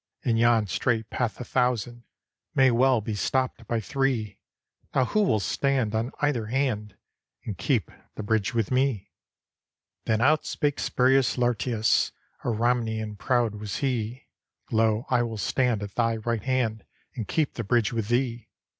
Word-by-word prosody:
In 120 -3 +2
yon 115 -1 +4
strait 110 +2 -1
path 120 -5 -2
a - - -4
thousand 120 -1 -1 0.5
May 130 -1 +5
well 125 0 +3
be 105 +1 -4
stopped 125 +2 -1
by 115 - 0
three. 115 -3 -1 0.6
Now 130 - +4
who 215 +11 +1
will 110 - +2
stand 130 +3 0
on 115 +4 -1
either 135 -7 +1
hand, 110 -5 -1 0.5
And - - -4
keep - - 0 0.2
the 110 - -5
bridge 110 -1 +1
with 115 0 0
me?" 130 -5 0 0.9
Then 110 -1 +1
out 150 +6 +3
spake 145 -1 -1
Spurius 130 +1 +2
Lartius; 120 -2 +1 0.3
A - - -5
Ramnian 110 -2 0
proud 120 0 +1
was 105 -2 -5
he: 125 -2 -2 0.5
"Lo, 110 0 +2
I 125 -1 +4
will 115 -2 -3
stand 120 -1 0
at 100 -1 -7
thy 115 -1 +1
right 115 0 -2
hand. 115 -3 -1 0.3
And 115 -7 -5
keep 155 +4 0
the 115 - -4
bridge 115 +1 +1
with 115 -3 -2
thee." 120 0 -1
120 Hz, 155 wpm, -26 LUFS, 110-130 Hz, 0.9 s, May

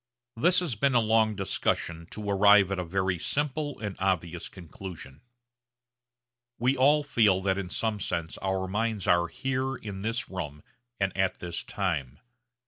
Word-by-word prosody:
This 175 +10 +4
has 170 -8 -1
been 130 +5 +1
a - - +7
long 110 -1 +3
discussion 85 -3 -1
to 105 -1 -7
arrive 100 -1 +6
at 95 - -1
a - - -1
very 95 +1 -1
simple 145 - -1
and 105 -3 -4
obvious 90 -3 -1
conclusion. 85 -5 -10 1.4
We 125 +3 +2
all 145 +3 +4
feel 110 -9 +3
that 95 0 +1
in 95 -2 -4
some 110 +2 -1
sense 85 -3 -3
our 95 -1 -1
minds 105 0 -1
are 85 0 +3
here 130 +8 -2
in 100 -4 -7
this 115 +4 -2
room 75 -6 -6 0.4
and 100 -1 0
at 95 -1 0
this 85 -1 -4
time. 75 -9 -3
100 Hz, 155 wpm, -28 LUFS, 90-115 Hz, 1.4 s, a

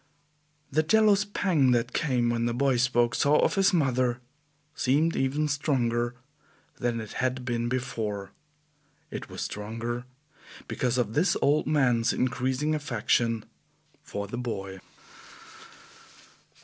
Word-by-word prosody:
The 155 +3 +3
jealous 205 +4 +4
pang 170 -10 +2
that 120 +1 0
came 125 -6 +1
when 115 0 0
the 120 - -1
boy 135 0 +2
spoke 120 -1 +2
so 145 +6 +3
of - - +3
his 195 -1 +3
mother 130 -7 +1 0.5
seemed 155 +4 +1
even 140 +3 0
stronger 120 -5 0 0.6
than 120 -2 -1
it 110 -1 -7
had 130 0 -1
been 120 -1 -1
before; 110 -6 -3 0.8
it - - -6
was - - -7
stronger 115 +3 -4 0.6
because 125 -1 -1
of 115 -4 0
this 160 +9 +2
old 150 +2 +2
man's 125 -6 +2
increasing 130 +4 0
affection 120 -6 0 0.6
for 100 0 -5
the 120 +4 -6
boy. 95 -6 -5
125 Hz, 125 wpm, -27 LUFS, 120-145 Hz, 0.8 s, jealous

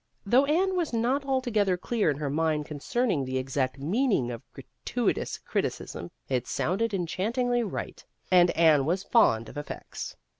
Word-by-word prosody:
Though 250 +7 +4
Anne 370 +6 +2
was 340 -7 -1
not 250 +5 +1
altogether 235 -8 +1
clear 215 0 0
in 145 - 0
her 145 -2 -2
mind 155 0 0
concerning 155 - -1
the 130 0 -2
exact 130 0 -1
meaning 175 - +1
of 115 - -6
"gratuitous - - -3
criticism," 85 - -3 0.2
it 125 -3 -1
sounded 215 +6 0
enchantingly 225 +7 0
right; 210 -5 -5 0.3
and 180 -1 +6
Anne 155 -4 +5
was 185 +4 0
fond 115 - +3
of - - -10
effects. 145 - -6
185 Hz, 150 wpm, -27 LUFS, 145-240 Hz, 0.3 s, and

